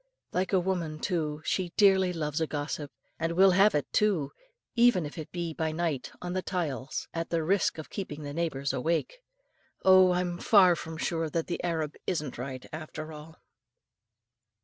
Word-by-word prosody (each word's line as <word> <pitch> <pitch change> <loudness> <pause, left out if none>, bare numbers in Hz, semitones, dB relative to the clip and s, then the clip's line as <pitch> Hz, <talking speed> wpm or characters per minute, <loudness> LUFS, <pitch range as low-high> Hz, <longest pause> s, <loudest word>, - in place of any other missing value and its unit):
Like 185 +1 -1
a 190 - +4
woman, 175 -4 -2
too, 155 -4 -2
she 180 -3 -1
dearly 190 -3 +5
loves 155 -2 -2
a 160 - +1
gossip, 145 -1 -4 0.3
and 165 +1 -1
will 190 +2 +6
have 195 +2 +5
it 145 - -2
too, 185 -10 +2 0.4
even 235 -8 +4
if 145 - -7
it 155 -3 -7
be 170 -2 -3
by 160 0 -1
night 155 -5 -2
on 175 0 -3
the 185 - 0
tiles, 155 -8 -3
at 165 0 -3
the 165 -1 0
risk 185 +2 +1
of 155 - -8
keeping 155 -6 -5
the 145 0 -5
neighbours 140 -5 -1
awake. 165 - -1 0.7
Oh! 185 -1 +7
I'm 180 -1 -1
far 185 -5 +6
from 160 0 -7
sure 165 0 -1
that 165 +1 -1
the 175 - -4
Arab 160 -4 -1
isn't 150 -9 -2
right, 130 0 -6
after 155 0 -7
all. 155 +1 -11
165 Hz, 175 wpm, -29 LUFS, 150-180 Hz, 0.7 s, Oh